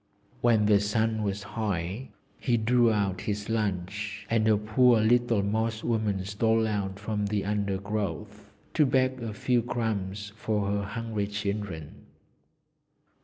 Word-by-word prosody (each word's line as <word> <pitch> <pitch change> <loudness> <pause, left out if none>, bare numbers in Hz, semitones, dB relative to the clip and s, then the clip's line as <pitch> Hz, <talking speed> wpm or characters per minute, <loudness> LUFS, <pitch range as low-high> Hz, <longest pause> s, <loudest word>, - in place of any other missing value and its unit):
When 115 -3 +4
the 105 -1 +5
sun 110 +2 0
was 100 -1 -2
high, 105 +2 -3 0.3
he 120 -2 +1
drew 120 +1 +3
out 100 -3 0
his 105 0 -3
lunch, 105 -1 -2
and 110 -1 +3
a 110 -1 +5
poor 110 +3 +4
little 115 -1 +3
Moss 110 +2 -1
woman 105 -5 0
stole 110 +2 +2
out 100 -2 -2
from 105 0 -2
the 100 -1 -1
undergrowth 100 -3 -3 0.2
to 150 - +4
beg 130 -1 +1
a 115 -2 -3
few 120 +3 +1
crumbs 105 -4 -3
for 105 -2 -1
her 100 0 0
hungry 105 0 -3
children. 100 -6 -5
105 Hz, 135 wpm, -28 LUFS, 100-115 Hz, 0.3 s, the